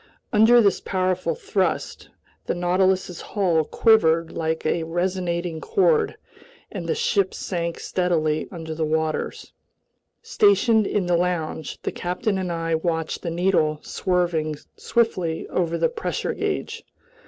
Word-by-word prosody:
Under 230 +3 +6
this 200 -3 +2
powerful 185 - -1
thrust 445 -2 -2 0.4
the - - 0
Nautilus's 185 0 +1
hull 180 -6 +1
quivered 165 -5 +3
like 160 0 -2
a 165 +2 +1
resonating 175 -1 -2
chord, 445 +3 +2 0.5
and - - -5
the - - +1
ship 205 - +1
sank 170 -2 -3
steadily 155 -4 0
under 165 -3 -6
the 160 0 -2
waters. 155 0 -2 0.7
Stationed 405 - +3
in 200 -3 0
the 175 0 +2
lounge, 170 -3 -2
the - - -2
captain 190 +3 -2
and 180 -2 -2
I 165 -1 -2
watched 160 -1 -1
the 170 - -3
needle 165 -3 +1
swerving 175 -5 0 0.2
swiftly 185 -9 0
over 170 -2 0
the - - +2
pressure 465 -1 -3
gauge. - - -3
180 Hz, 130 wpm, -23 LUFS, 165-200 Hz, 0.7 s, Under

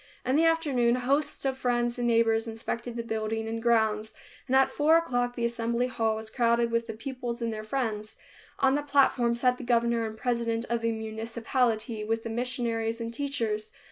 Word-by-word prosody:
In 255 +2 +2
the 320 +2 +4
afternoon, 280 -8 +2
hosts 275 +4 0
of 265 -1 -1
friends 240 -1 0
and 240 - +1
neighbors 225 -1 +3
inspected 230 +1 -4
the 235 - -3
building 220 0 -2
and 225 0 -3
grounds, 220 -2 +1 0.3
and 260 - +1
at 265 0 +6
four 310 +2 +4
o'clock 245 -7 0
the 235 - -1
Assembly 235 +1 0
Hall 225 -3 0
was 220 0 -7
crowded 235 -1 +2
with 230 0 0
the 225 - -4
pupils 245 0 -5
and 230 -1 -2
their 215 - -5
friends. 215 -2 -3 0.4
On 270 -1 +3
the 290 - +1
platform 275 -4 +3
sat 250 +1 +1
the - - -6
governor 235 -1 +2
and 220 0 -8
president 235 -1 -1
of 235 -1 0
the 230 0 +1
municipality, 225 +1 -1
with 225 +1 -1
the 230 - -4
missionaries 230 -1 -1
and 230 0 -4
teachers. 225 -6 -2
235 Hz, 190 wpm, -28 LUFS, 225-250 Hz, 0.4 s, at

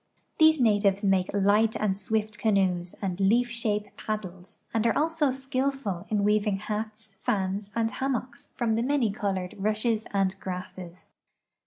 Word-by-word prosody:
These 315 -1 +6
natives 205 -4 +3
make 190 -2 +2
light 205 +2 +3
and 205 -3 0
swift 210 +1 -2
canoes 185 -5 +1
and 185 -1 -2
leaf 235 +5 +3
shape 210 -3 -2
pad 215 0 -2
dles, 185 0 -12
and 225 0 +2
are 230 - +2
also 315 -1 +2
skillful 265 -7 -2
in 210 -2 +1
weaving 210 -1 +2
hats, 215 +1 -5
fans, 195 +1 -1
and 225 -1 +1
hammocks 265 +1 -3
from 235 -2 0
the 225 - +1
many 255 -4 +1
colored 190 -3 -2
rushes 215 +2 0
and 195 -1 +1
grasses. 180 -1 -7
210 Hz, 150 wpm, -27 LUFS, 195-230 Hz, -, These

